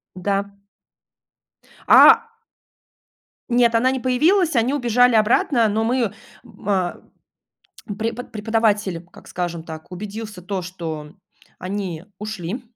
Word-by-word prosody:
Да. 200 +2 -2 1.3
А - - +9 1.3
Нет, 240 -1 +3
она 240 +3 +3
не 265 0 -2
появилась. 315 +8 +2
Они 240 +4 +2
убежали 245 -2 +3
обратно, 225 +2 +3
но 215 +2 0
мы, 235 -3 0 0.3
м, 220 -4 -13
а, 185 -3 0 1.0
препод 230 +2 -4
преподаватель, 210 -5 0
как - - -15
скажем 175 -2 -4
так, 160 0 -10
убедился 210 +1 -7
то, 185 +1 -4
что 165 -4 -7 0.4
они 185 -3 -5
ушли 210 +2 -5
210 Hz, 110 wpm, -21 LUFS, 185-235 Hz, 1.3 s, А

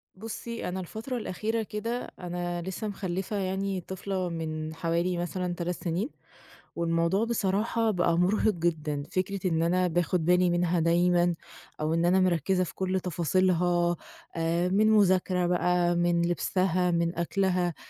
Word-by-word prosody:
بُصي، 225 +2 -5
أنا 185 +1 -3
الفترة 220 +8 -5
الأخيرة 220 +1 -2
كده 230 +3 -4
أنا 175 -1 -3
لسّه 190 +5 -4
مخلّفة 190 0 -3
يعني 190 0 -2
طفلة 190 0 -3
من 160 -1 -4
حوالي 170 +2 0
مثلًا 175 +1 -2
3 175 0 -3
سنين، 180 - -1 0.7
والموضوع 170 +4 +1
بصراحة 225 0 0
بقى 175 -3 +1
مُرهِق 210 +4 +2
جدًا 155 -4 -1
فكرة 190 +1 -1
إن 165 -1 +1
أنا 180 +2 +2
باخد 175 0 0
بالي 180 +1 +4
منها 175 0 +1
دايمًا، 175 +1 +3 0.5
أو 155 +1 0
إن 165 - +1
أنا 180 +2 +4
مركّزة 185 0 +2
في - - -9
كل 190 0 -1
تفاصيلها، 175 0 +1 0.4
آآ 170 +2 +1
من 210 +3 +3
مذاكرة 185 -3 +3
بقى 175 0 +2
من 175 0 +2
لبسها 180 +1 +1
من 170 0 0
أكلها، 180 -1 +1
180 Hz, 140 wpm, -28 LUFS, 170-190 Hz, 0.7 s, بالي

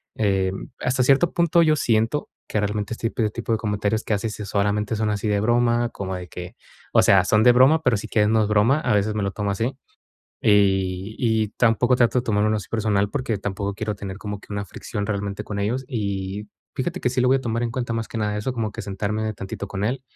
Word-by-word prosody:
em, 95 -1 0
hasta 125 +1 +1
cierto 140 +6 +4
punto, 170 0 +3
yo 155 -2 +4
siento 115 +1 +1 0.2
que 110 - -1
realmente 105 +1 -2
este 115 0 -3
p 110 -2 0
tipo 115 +2 -5
de 110 - +3
comentarios 105 0 -1
que - - -1
hace 105 +2 -1
sí 105 0 -6
solamente 105 +2 0
son 105 0 0
así 105 +1 -2
de 105 -1 +2
broma, 120 +2 +2
como 95 -3 -5
de 90 -1 -7
que, 90 +1 -8 0.4
o - - +6
sea, 95 -1 +6
son 105 +1 +3
de 125 - +8
broma, 135 +6 +5
pero 125 -5 +3
si 100 - -4
quieres 105 -1 +2
no 110 0 +3
es 105 - +1
broma, 110 +8 +3
a 120 - +1
veces 105 +1 +1
me 105 - -1
lo 100 - -1
tomo 100 -1 -2
así. 115 +7 -2 0.7
Y 95 -1 +2
y 110 -3 +1
tampoco 120 +2 +3
trato 125 +1 +3
de 125 - -2
tomármelo 110 0 +1
así 105 - -6
personal, 105 -3 0
porque 125 -4 -2
tampoco 100 0 -3
quiero 110 -1 -3
tener 100 -1 -7
como 105 -1 -5
que 105 - -12
una 100 0 -2
fricción 100 +2 -5
realmente 100 -1 -3
con 100 - -5
ellos. 120 +6 -1
Y 100 -3 -3 0.3
fíjate 175 +7 -3
que 125 - +1
sí 130 - 0
lo 125 - +3
voy 135 - +5
a - - -6
tomar 115 -1 -2
en 120 - -1
cuenta, 120 -1 -3
más 115 -1 -3
que 115 - -5
nada 105 -1 -1
eso, 105 +5 -2
como 110 -4 -3
que - - -6
sentarme 105 +2 -2
tantito 100 0 -6
con 100 +1 -3
él, 130 +4 -1
105 Hz, 240 wpm, -23 LUFS, 100-120 Hz, 0.7 s, de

